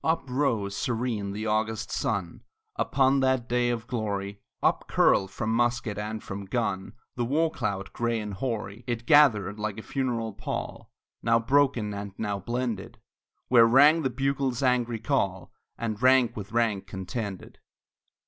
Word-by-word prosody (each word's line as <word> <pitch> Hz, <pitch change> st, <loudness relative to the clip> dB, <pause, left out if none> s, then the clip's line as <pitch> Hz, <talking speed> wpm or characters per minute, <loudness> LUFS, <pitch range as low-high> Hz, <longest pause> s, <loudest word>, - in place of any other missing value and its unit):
Up 160 Hz, -1 st, +1 dB
rose 120 Hz, -7 st, 0 dB
serene 115 Hz, -4 st, -2 dB
the 105 Hz, +2 st, -4 dB
August 110 Hz, 0 st, -1 dB
sun 95 Hz, -6 st, -2 dB, 0.3 s
Upon 135 Hz, 0 st, +2 dB
that 130 Hz, -2 st, +1 dB
day 120 Hz, 0 st, +1 dB
of 115 Hz, -2 st, -2 dB
glory; 100 Hz, -4 st, -3 dB, 0.2 s
Up -, -, +2 dB
curled 95 Hz, -, +3 dB
from 110 Hz, +2 st, -3 dB
musket 120 Hz, -2 st, 0 dB
and 105 Hz, +1 st, -4 dB
from 100 Hz, 0 st, -6 dB
gun 100 Hz, -3 st, -2 dB, 0.2 s
The 120 Hz, -, 0 dB
war 155 Hz, +6 st, +1 dB
cloud, 100 Hz, -7 st, -3 dB
gray 120 Hz, -1 st, -1 dB
and 105 Hz, -1 st, -5 dB
hoary; 110 Hz, 0 st, -4 dB
It 120 Hz, -1 st, -3 dB
gathered 110 Hz, -, +4 dB
like 105 Hz, -1 st, -3 dB
a 110 Hz, -, -7 dB
funeral 120 Hz, -5 st, -2 dB
pall, 100 Hz, -, -5 dB, 0.3 s
Now 115 Hz, 0 st, +3 dB
broken, 125 Hz, -3 st, +2 dB
and 100 Hz, -1 st, -6 dB
now 105 Hz, -2 st, -2 dB
blended, 120 Hz, 0 st, -3 dB, 0.5 s
Where 115 Hz, -2 st, +6 dB
rang 145 Hz, +7 st, +6 dB
the 135 Hz, -, 0 dB
bugle's 135 Hz, 0 st, -1 dB
angry 120 Hz, -2 st, +1 dB
call, 100 Hz, -6 st, -1 dB, 0.2 s
And 110 Hz, -2 st, -3 dB
rank 130 Hz, -2 st, +4 dB
with 105 Hz, -1 st, -7 dB
rank 110 Hz, -5 st, 0 dB
contended. 95 Hz, +1 st, -6 dB
115 Hz, 150 wpm, -27 LUFS, 105-125 Hz, 0.5 s, Where